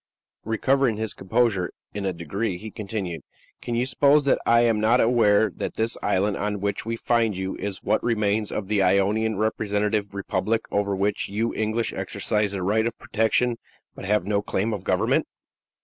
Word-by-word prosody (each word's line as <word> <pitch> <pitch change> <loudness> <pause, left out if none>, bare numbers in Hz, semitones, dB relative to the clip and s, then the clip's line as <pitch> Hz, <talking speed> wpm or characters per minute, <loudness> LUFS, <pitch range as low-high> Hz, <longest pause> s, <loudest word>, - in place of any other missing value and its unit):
Recovering 120 +2 +1
his 110 -1 -3
composure 95 -2 0 0.2
in 100 -1 -4
a 95 - +1
degree, 90 +4 -3
he 110 +4 -8
continued: 100 -6 -5 0.4
"Can 120 - -3
you 120 +2 +1
suppose 140 +2 +3
that 140 - +3
I 115 0 +5
am 115 -2 +2
not 115 +4 +3
aware 110 -3 +4
that - - -5
this 110 +1 +1
island 100 0 +1
on 105 0 -2
which 100 +2 -3
we 115 - -1
find 115 -3 +1
you 95 0 -3
is 100 -2 -5
what - - +1
remains 105 -2 0
of 100 - -3
the 105 -1 +1
Ionian 100 +3 +2
representative 105 -1 -1
republic, 100 +3 -1
over 100 -1 0
which 100 +1 -1
you 110 +4 -1
English 110 +1 -1
exercise 105 -1 -1
the 95 -2 -3
right 110 +4 +2
of 115 - -5
protection, 115 +2 +1 0.4
but - - -9
have 105 -2 +1
no 100 0 +1
claim 105 +2 -1
of 100 -3 -5
government?" - - +1
105 Hz, 180 wpm, -24 LUFS, 100-115 Hz, 0.4 s, I